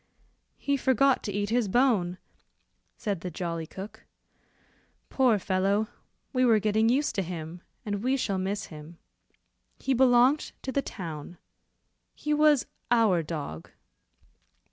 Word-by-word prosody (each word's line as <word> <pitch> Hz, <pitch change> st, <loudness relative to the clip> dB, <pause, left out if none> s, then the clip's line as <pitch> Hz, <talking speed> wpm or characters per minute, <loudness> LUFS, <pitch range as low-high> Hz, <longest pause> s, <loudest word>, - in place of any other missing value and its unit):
"He 280 Hz, 0 st, 0 dB
forgot 265 Hz, 0 st, +3 dB
to 205 Hz, -, -4 dB
eat 205 Hz, +1 st, -2 dB
his 240 Hz, -2 st, +2 dB
bone," 195 Hz, -6 st, +2 dB, 0.8 s
said 200 Hz, -7 st, -3 dB
the 180 Hz, -, -4 dB
jolly 165 Hz, -1 st, -4 dB
cook; 200 Hz, +5 st, -9 dB, 1.1 s
"poor 250 Hz, -5 st, +4 dB
fellow, 195 Hz, +3 st, 0 dB, 0.4 s
we 255 Hz, -1 st, +2 dB
were 230 Hz, -3 st, +5 dB
getting 215 Hz, +2 st, +2 dB
used 280 Hz, +5 st, +1 dB
to 195 Hz, -, 0 dB
him, 170 Hz, -1 st, -6 dB, 0.2 s
and 205 Hz, -1 st, -2 dB
we 260 Hz, +3 st, +1 dB
shall 200 Hz, -7 st, -1 dB
miss 195 Hz, +2 st, -2 dB
him. 155 Hz, +2 st, -11 dB, 0.8 s
He 270 Hz, -, 0 dB
belonged 255 Hz, +3 st, +4 dB
to 265 Hz, -, -3 dB
the 280 Hz, -, +1 dB
town 170 Hz, -, -7 dB, 0.8 s
he 300 Hz, -, -2 dB
was 300 Hz, -2 st, +4 dB, 0.3 s
'our 220 Hz, -8 st, +4 dB
dog. 150 Hz, -, -6 dB
210 Hz, 130 wpm, -28 LUFS, 180-255 Hz, 1.1 s, were